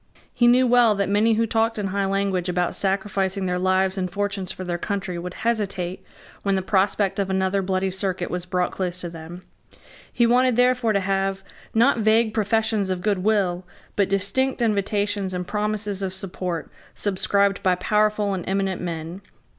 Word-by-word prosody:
He 240 Hz, -1 st, +3 dB
knew 250 Hz, +2 st, +5 dB
well 240 Hz, -3 st, +5 dB
that 200 Hz, -1 st, -1 dB
many 215 Hz, +3 st, +3 dB
who 230 Hz, +1 st, +2 dB
talked 225 Hz, 0 st, 0 dB
in 200 Hz, -2 st, -2 dB
high 200 Hz, +1 st, 0 dB
language 195 Hz, -2 st, 0 dB
about 180 Hz, -1 st, 0 dB
sacrificing 195 Hz, -1 st, -1 dB
their 180 Hz, 0 st, -1 dB
lives 185 Hz, +1 st, +1 dB
and 185 Hz, -1 st, -1 dB
fortunes 200 Hz, -1 st, -2 dB
for 185 Hz, -, -7 dB
their 175 Hz, -1 st, -3 dB
country 190 Hz, -3 st, -3 dB
would 180 Hz, +1 st, -6 dB
hesitate 195 Hz, -6 st, -1 dB, 0.4 s
when 195 Hz, -1 st, +1 dB
the 190 Hz, -, -1 dB
prospect 195 Hz, +1 st, +1 dB
of 195 Hz, -1 st, 0 dB
another 190 Hz, +1 st, +1 dB
Bloody 190 Hz, 0 st, -1 dB
Circuit 185 Hz, -2 st, -2 dB
was 180 Hz, 0 st, -4 dB
brought 180 Hz, 0 st, 0 dB
close 180 Hz, -1 st, -3 dB
to 175 Hz, -, -5 dB
them. 170 Hz, +2 st, -9 dB, 0.7 s
He 235 Hz, -, +2 dB
wanted 250 Hz, +1 st, +3 dB
therefore 250 Hz, -2 st, +3 dB
to 200 Hz, -, +1 dB
have, 195 Hz, 0 st, -1 dB, 0.3 s
not 235 Hz, +2 st, +4 dB
vague 220 Hz, +1 st, +3 dB
professions 220 Hz, -2 st, +1 dB
of 185 Hz, -1 st, -2 dB
good 205 Hz, -3 st, +1 dB
will, 185 Hz, -3 st, +1 dB, 0.3 s
but 200 Hz, -2 st, +2 dB
distinct 200 Hz, +8 st, 0 dB
invitations 205 Hz, -3 st, 0 dB
and 180 Hz, 0 st, -3 dB
promises 210 Hz, 0 st, -1 dB
of 190 Hz, -1 st, -3 dB
support 180 Hz, -3 st, -4 dB, 0.2 s
subscribed 200 Hz, 0 st, +1 dB
by 185 Hz, -1 st, +3 dB
powerful 210 Hz, +2 st, +1 dB
and 185 Hz, -2 st, -3 dB
eminent 195 Hz, -1 st, -1 dB
men. 170 Hz, +1 st, -5 dB
195 Hz, 175 wpm, -23 LUFS, 185-210 Hz, 0.7 s, knew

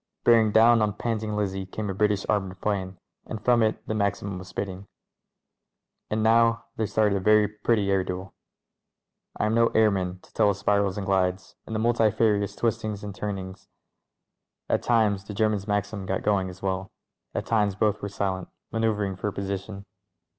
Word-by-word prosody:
Bearing 115 Hz, -2 st, +5 dB
down 115 Hz, +1 st, +6 dB
on 105 Hz, -1 st, +1 dB
Panting 110 Hz, -1 st, -2 dB
Lizzie 95 Hz, -2 st, -2 dB
came 105 Hz, +2 st, -5 dB
a 95 Hz, -, -2 dB
British 105 Hz, 0 st, +1 dB
ar 105 Hz, -, +3 dB
moured 95 Hz, -1 st, -9 dB
'plane, 95 Hz, -3 st, -2 dB, 0.3 s
and 110 Hz, -, -5 dB
from 120 Hz, -1 st, +4 dB
it 110 Hz, -1 st, 0 dB
the -, -, -1 dB
Maxim 100 Hz, -2 st, -1 dB
was 95 Hz, -, -10 dB
spitting. 95 Hz, 0 st, -5 dB, 1.2 s
And 110 Hz, 0 st, 0 dB
now 115 Hz, +1 st, +4 dB
there 110 Hz, -, -1 dB
started 105 Hz, 0 st, +2 dB
a -, -, +1 dB
very 105 Hz, +2 st, +4 dB
pretty 105 Hz, -1 st, 0 dB
air 95 Hz, -1 st, +2 dB
duel. 90 Hz, +1 st, -6 dB, 1.0 s
I -, -, 0 dB
am 110 Hz, -, +1 dB
no 115 Hz, 0 st, +4 dB
airman, 95 Hz, -5 st, +2 dB
to -, -, -22 dB
tell 105 Hz, -2 st, +3 dB
of 100 Hz, -, 0 dB
spirals, 100 Hz, -1 st, +1 dB
and 100 Hz, -, -3 dB
glides, 95 Hz, -1 st, 0 dB
and 110 Hz, -, -4 dB
the -, -, 0 dB
multi 115 Hz, -1 st, +3 dB
farious 105 Hz, -2 st, +1 dB
twistings 110 Hz, -3 st, -2 dB
and 100 Hz, -1 st, -5 dB
turnings. 95 Hz, -1 st, -6 dB, 1.0 s
At -, -, +1 dB
times 105 Hz, -5 st, +2 dB
the 105 Hz, -, -7 dB
Ger 110 Hz, +1 st, +3 dB
man's 105 Hz, -1 st, -3 dB
Maxim 105 Hz, -1 st, -2 dB
got 95 Hz, 0 st, -2 dB
going 100 Hz, -3 st, +1 dB
as 90 Hz, +1 st, -12 dB
well; 95 Hz, 0 st, -2 dB, 0.4 s
at -, -, -2 dB
times 105 Hz, -4 st, +1 dB
both 105 Hz, 0 st, +1 dB
were 100 Hz, -, -4 dB
silent, 95 Hz, -2 st, -2 dB, 0.2 s
manoeuvring 105 Hz, -4 st, 0 dB
for 105 Hz, +2 st, -2 dB
position. 100 Hz, +1 st, -5 dB
105 Hz, 185 wpm, -26 LUFS, 95-110 Hz, 1.2 s, down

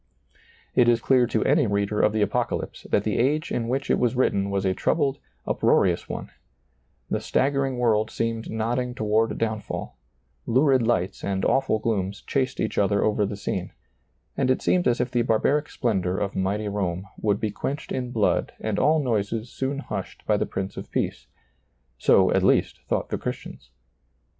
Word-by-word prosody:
It 120 Hz, -1 st, +5 dB
is 120 Hz, -1 st, +4 dB
clear 125 Hz, +1 st, +3 dB
to -, -, 0 dB
any 145 Hz, -2 st, +3 dB
reader 100 Hz, +1 st, 0 dB
of 105 Hz, -, +4 dB
the 110 Hz, 0 st, +1 dB
Apocalypse -, -, -2 dB
that 100 Hz, -, +2 dB
the 105 Hz, -, -1 dB
age 150 Hz, +6 st, +1 dB
in 115 Hz, -1 st, -1 dB
which 135 Hz, +3 st, -1 dB
It -, -, +2 dB
was 125 Hz, 0 st, +1 dB
written 100 Hz, -6 st, +1 dB
was 100 Hz, -1 st, -1 dB
a 95 Hz, -, +2 dB
troubled, 140 Hz, -, 0 dB, 0.3 s
up -, -, -2 dB
roarious -, -, +3 dB
one; -, -, -5 dB, 0.8 s
the -, -, +1 dB
staggering 135 Hz, -1 st, 0 dB
world 110 Hz, -3 st, +2 dB
seemed 115 Hz, 0 st, -3 dB
nodding 120 Hz, +3 st, -1 dB
toward 110 Hz, 0 st, +1 dB
downfall; 110 Hz, -2 st, -3 dB, 0.5 s
lurid 130 Hz, +2 st, +4 dB
lights 100 Hz, -5 st, 0 dB
and 95 Hz, -1 st, -1 dB
awful 135 Hz, -4 st, +2 dB
glooms 105 Hz, -2 st, -2 dB
chased 130 Hz, -2 st, -1 dB
each 110 Hz, -, -1 dB
other 100 Hz, 0 st, +2 dB
over 105 Hz, -1 st, +1 dB
the 100 Hz, -, -5 dB
scene; 100 Hz, -, -4 dB, 0.6 s
and 130 Hz, -2 st, +1 dB
it 130 Hz, -, +1 dB
seemed 180 Hz, -1 st, +2 dB
as 120 Hz, 0 st, +2 dB
if 125 Hz, 0 st, -1 dB
the 120 Hz, -1 st, +2 dB
barbaric 135 Hz, +6 st, +1 dB
splendor 95 Hz, -7 st, -1 dB
of 100 Hz, -1 st, -2 dB
mighty 100 Hz, +3 st, -1 dB
Rome 95 Hz, -3 st, -2 dB
would 105 Hz, -1 st, +1 dB
be 110 Hz, -, -1 dB
quenched 140 Hz, +8 st, -4 dB
in 125 Hz, -1 st, -2 dB
blood 110 Hz, -4 st, +1 dB
and 110 Hz, -2 st, -2 dB
all 155 Hz, 0 st, +3 dB
noises 115 Hz, -1 st, -1 dB
soon 135 Hz, +1 st, -2 dB
hushed 140 Hz, -, -6 dB
by -, -, +3 dB
the -, -, 0 dB
Prince 95 Hz, 0 st, -4 dB
of -, -, -7 dB
Peace: -, -, -2 dB, 0.7 s
so, -, -, +5 dB
at -, -, +3 dB
least, -, -, +2 dB
thought -, -, -1 dB
the -, -, -2 dB
Christians. -, -, -6 dB
115 Hz, 180 wpm, -25 LUFS, 100-130 Hz, 0.8 s, It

